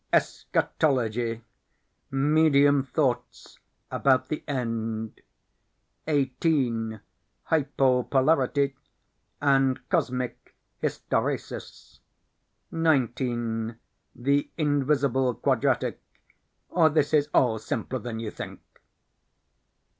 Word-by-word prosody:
Eschatology 120 -5 0 0.7
Medium 145 0 +4
Thoughts 130 -3 -2 0.3
about 130 -2 +2
the 155 - -3
End. 115 -4 -3 0.9
18. 130 -6 0 0.4
Hypo 135 -4 +2
polarity 140 +2 +2 0.6
and 135 -2 +2
Cosmic 125 -8 -2 0.3
Hysteresis. - - -3 0.7
19. 120 -7 0 0.4
The 140 +3 +1
Invisible 140 -4 +1
Quadratic, - - 0 0.7
or 165 -3 +4
This 150 0 +1
is 150 -1 +3
All 115 -6 +3
Simpler 115 +4 -3
than 120 -2 -5
You 110 -2 -4
Think. - - -8
135 Hz, 70 wpm, -26 LUFS, 120-145 Hz, 0.9 s, Medium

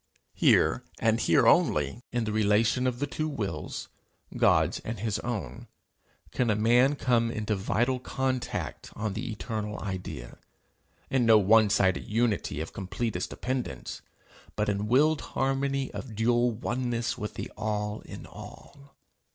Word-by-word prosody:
Here, - - +3
and - - +2
here - - +4
only, 75 - +3
in 120 -1 0
the 110 - -2
relation 110 +4 +2
of 125 -1 -1
the 145 - -1
two 155 +2 -3
wills, 100 - -4 0.5
God's - - +3
and 115 -1 -6
his 110 0 -1
own, 100 - -5 0.6
can 125 -2 0
a 105 - +3
man 120 +6 +4
come 120 -4 +2
into 110 -1 -1
vital 120 +6 0
contact 130 0 -3
on 105 -2 -2
the 115 +5 -4
eternal 105 -1 -4
idea, 90 - -6 0.7
in 125 -3 +2
no 110 -1 +8
one 105 +1 +5
sided 95 -3 +2
unity 110 -7 0
of 80 - -6
completest 95 0 -3
dependence, 130 0 -4 0.5
but 105 0 0
in 105 +1 -1
willed 145 +5 +3 0.2
harmony 135 0 0
of 115 -5 -7
dual 120 +2 +3
oneness 120 0 -2
with 105 - -6
the - - -5
All 105 -1 -2
in - - -9
all. 140 -1 -13
115 Hz, 145 wpm, -28 LUFS, 105-125 Hz, 0.7 s, no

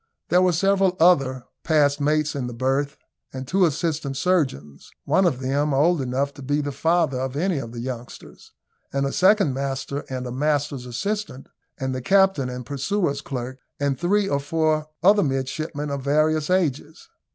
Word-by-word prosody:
There 180 +2 +4
were 185 -1 +4
several 190 +1 +2
other 135 -7 +3 0.2
passed 145 -2 +2
mates 150 +1 +1
in 135 -3 -3
the 120 - -7
berth, 135 +3 -1 0.3
and 130 0 -7
two 185 +3 +3
assistant 150 -2 -2
surgeons 130 - -1 0.2
one 190 -1 +3
of 130 -6 -1
them 140 +2 0
old 160 +3 +3
enough 135 +2 -1
to - - -12
be 145 +2 0
the 145 -1 -2
father 160 -2 +1
of 130 0 -3
any 170 0 0
of 115 -4 -7
the 120 0 -6
youngsters 125 -1 -8 0.4
and 140 0 0
a 135 - -1
second 195 -6 +3
master 135 +1 -3
and 130 -1 -4
a 125 - -5
master's 145 -1 -1
assistant, 200 - -4 0.3
and 130 0 -3
the 130 - -4
captain 190 -4 +3
and 125 -1 -6
purser's 145 +1 -1
clerks, 130 -4 -6 0.2
and 140 -2 -1
three 200 +3 +2
or 140 - 0
four 155 +1 0 0.2
other 205 +3 +6
midshipmen 145 +1 -2
of 140 -1 -3
various 155 +3 +1
ages. 160 -4 -1
145 Hz, 175 wpm, -23 LUFS, 130-170 Hz, 0.4 s, other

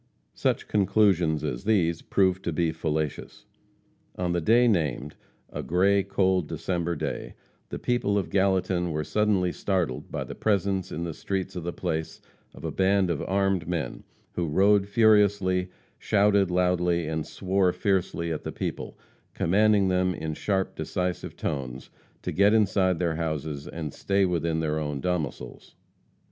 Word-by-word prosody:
Such - - -1
conclusions 95 -6 +2
as 65 -5 -3
these 85 -7 +1
proved 95 -1 +1
to 85 - 0
be 80 0 0
fallacious. 80 -2 -3 0.7
On 90 -1 -1
the 85 0 0
day 120 +8 +4
named 75 - 0 0.4
a - - -4
gray, 100 +4 +3
cold 95 -3 +1
December 85 0 -2
day - - -4 0.3
the - - -4
people 120 -5 0
of 95 - -2
Gallatin 95 -2 +1
were 75 -1 -2
suddenly 100 0 +1
startled 90 -11 -2
by - - -3
the - - -8
presence, 100 -3 0
in 85 - -4
the 85 -1 -4
streets 95 +3 -4
of 90 - -4
the 85 - -3
place, 80 -1 -3 0.4
of - - -9
a - - -2
band 95 -1 +2
of 80 - -2
armed 95 -3 0
men, 85 -3 -3 0.3
who 85 -1 -2
rode 100 +5 +3
furiously, 100 -4 +3 0.3
shouted 100 -2 +3
loudly, 90 -1 +1
and 80 -1 -3
swore 95 -1 +1
fiercely 90 -3 -1
at 75 - -4
the - - -4
people, - - -5 0.4
commanding 100 +2 +3
them, 90 0 +1
in 80 0 -4
sharp, 95 +4 -1
decisive 90 -1 -3
tones, 65 -2 -4 0.3
to - - -2
get 100 +3 +4
inside 95 -4 +2
their 85 -2 -1
houses 80 -2 -3
and 80 -5 -6
stay 100 0 +1
within 85 -2 0
their 80 -1 -1
own 75 -2 -3
domicils. 85 -3 -4
90 Hz, 155 wpm, -26 LUFS, 80-100 Hz, 0.7 s, day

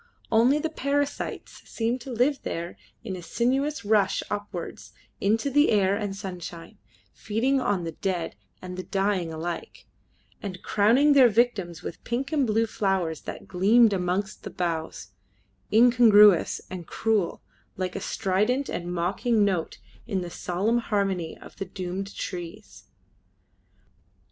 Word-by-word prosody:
Only 235 +6 +5
the 315 +1 -2
parasites 285 -1 -2
seemed 235 +2 -1
to 260 - -8
live 255 +4 +1
there 170 +1 -4 0.3
in 200 -5 -4
a 180 - -7
sinuous 265 - -1
rush 205 -2 +2
upwards 205 -4 -6 0.3
into 225 +7 +1
the 290 +3 +4
air 200 -2 +3
and 205 -2 -3
sunshine, 180 0 -8 0.3
feeding 255 +6 0
on 200 -7 0
the 165 - -3
dead 175 - -3 0.3
and 180 0 -7
the - - -2
dying 195 -4 0
alike, 165 +2 -6 0.6
and 185 -3 -6
crowning 240 +8 +4
their 260 -4 +7
victims 205 -7 0
with - - -7
pink 250 +5 -3
and 285 -5 +2
blue 225 +1 +2
flowers 190 -7 -1
that - - -8
gleamed 210 +5 +4
amongst 185 +2 -2
the - - -7
boughs, 165 - -4 0.6
incongruous 220 -5 +6
and 180 -3 -8
cruel, 220 -6 0 0.3
like 185 -1 -3
a - - -3
strident 215 +9 0
and 175 0 -4
mocking 200 +6 +1
note 185 -5 -1 0.3
in 195 -5 -1
the 175 -1 -6
solemn 200 +9 0
harmony 195 -7 -1
of - - -14
the 195 - -4
doomed 190 +1 -5
trees. 180 +3 -7
200 Hz, 140 wpm, -26 LUFS, 180-235 Hz, 0.6 s, their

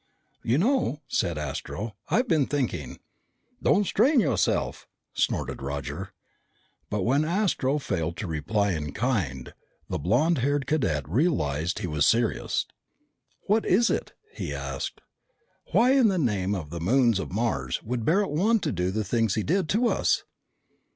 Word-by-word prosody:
"You 120 +4 +1
know," 215 - +1
said 85 -4 0
Astro, 95 - -5
"I've 250 +3 +2
been 155 - +2
thinking." 100 - -2 0.6
"Don't 205 - +3
strain 255 - +3
yourself," 165 -11 0 0.3
snorted - - -1
Roger. 70 -1 -5 0.8
But 105 -2 -1
when 135 +7 +2
Astro 165 -5 +1
failed 85 - -2
to - - -4
reply 100 +6 0
in 75 -4 -3
kind, 95 - -2 0.4
the - - -2
blond 125 - +2
haired 140 +2 0
cadet 80 - 0
realized 85 - 0
he 105 - -3
was 75 -2 +2
serious. 115 -1 +1 0.8
"What 215 +2 +1
is 230 +6 +3
it?" - - -2 0.2
he - - -4
asked. - - -5 0.7
"Why, 245 +3 +5
in 265 -4 +5
the 195 -3 +1
name 105 - 0
of 80 -6 -6
the 85 -1 -5
moons 115 +2 +3
of - - -5
Mars, 100 - -1
would 120 0 -3
Barret 190 - +2
want 205 +8 +2
to - - 0
do 90 -1 -1
the 105 +3 -1
things 115 0 +1
he 110 - 0
did 180 0 0
to 235 +4 +2
us?" - - +1
115 Hz, 150 wpm, -26 LUFS, -, 0.8 s, Why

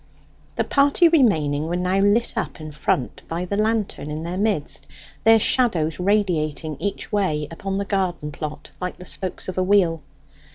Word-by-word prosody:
The - - +1
party 285 +5 +4
remaining 160 - +2
were 175 - -1
now 180 +2 +1
lit 205 +4 +3
up - - -3
in 155 -1 -7
front 145 -3 -1
by 170 +2 -3
the 200 - -2
lantern 215 -7 -1
in 155 +1 -4
their 170 +2 -4
midst, 200 -8 -1 0.4
their 225 0 +8
shadows 180 - +2
radiating 170 -6 0
each 200 - -4
way 155 -8 0
upon 195 +3 -4
the 200 - -1
garden 185 -6 -1
plot 150 0 -7
like 180 0 -3
the 180 - -10
spokes 185 0 -2
of 185 0 -3
a - - +2
wheel. 185 -5 +3
185 Hz, 170 wpm, -22 LUFS, 155-205 Hz, 0.4 s, their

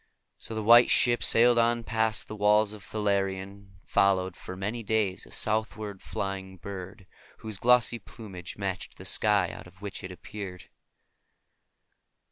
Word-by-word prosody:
So 110 - -6
the 110 - -3
White 120 +3 +7
Ship 120 -1 +3
sailed 120 +1 +6
on 115 0 +2
past 110 -1 0
the 110 - -7
walls 105 0 +3
of 105 - -11
Thalarion, 100 -3 -1
and 100 0 -14
followed 95 -2 +2
for 95 - -9
many 105 +5 -3
days 105 -3 -1
a - - -17
southward 110 -2 -2
flying 95 -1 -5
bird, 95 -1 -8 0.3
whose 110 -3 -6
glossy 120 -1 +3
plumage 95 -5 -10
matched - - -4
the - - -11
sky 105 -4 +2
out - - -10
of 90 +1 -19
which 100 -1 -6
it 90 - -7
had 90 - -10
appeared. 95 -5 -8
105 Hz, 155 wpm, -28 LUFS, 95-110 Hz, 0.3 s, White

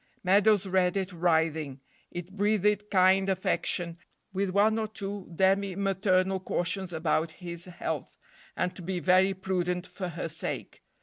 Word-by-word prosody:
Meadows 200 +1 +4
read 185 0 +2
it 190 0 -2
writhing. 160 -4 +1 0.3
It 175 +1 -7
breathed 210 0 +1
kind 190 0 +4
affection, 175 -2 -1 0.3
with 195 0 0
one 210 +4 +3
or 220 - -1
two 200 -3 -6
demi 190 +1 +2
maternal 190 -1 +1
cautions 185 +1 -2
about 160 0 0
his 170 -1 -6
health, 180 -2 -5 0.4
and 180 0 -1
to 185 - -9
be 180 +1 -3
very 185 +2 +4
prudent 180 -1 -1
for 185 -1 -6
her 170 -1 -4
sake. 155 -1 -4
185 Hz, 140 wpm, -29 LUFS, 175-195 Hz, 0.4 s, Meadows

